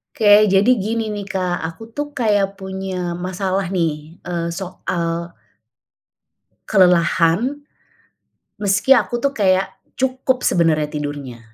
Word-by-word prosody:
Oke. 210 -1 +6
Jadi 205 +5 +4
gini 220 +2 -2
nih, 205 -1 -5
Kak, 185 -2 -2
aku 225 +8 -11
tuh 290 +5 -3
kayak 205 -5 +1
punya 190 -2 -4
masalah 185 +1 -2
nih, 165 -3 -2
eee, 170 -1 -3
soal 170 -1 -4 1.3
kelelahan. 185 - +3 1.0
Meski 205 +6 +4
aku 240 0 0
tuh 280 +3 0
kayak, 190 -2 +2 0.3
cukup 260 0 0
sebenarnya 160 -3 +2
tidurnya. 145 -5 -5
190 Hz, 110 wpm, -20 LUFS, 170-215 Hz, 1.3 s, Oke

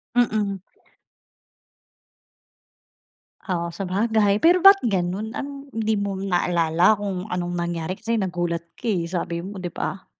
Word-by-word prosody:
Mm. 210 -5 +1 2.9
Oo, 170 -2 -2
sabagay. 205 +2 +1
Pero 350 +7 +4
ba't 390 +2 +9
ganun, 195 +1 -1
anong 280 0 -7
hindi 220 -1 0
mo 200 -1 -2
naalala 175 -1 +2
kung 195 -3 -3
anong 175 -4 -3
nangyari, 170 +1 -3
kasi 230 +1 -3
nagulat 175 -5 -1 0.2
ka - - -12
eh, 175 -7 0
sabi 170 -1 -3
mo, 195 +3 -7
'di 180 -2 -5
ba? 190 - -4
195 Hz, 125 wpm, -23 LUFS, 175-220 Hz, 2.9 s, ba't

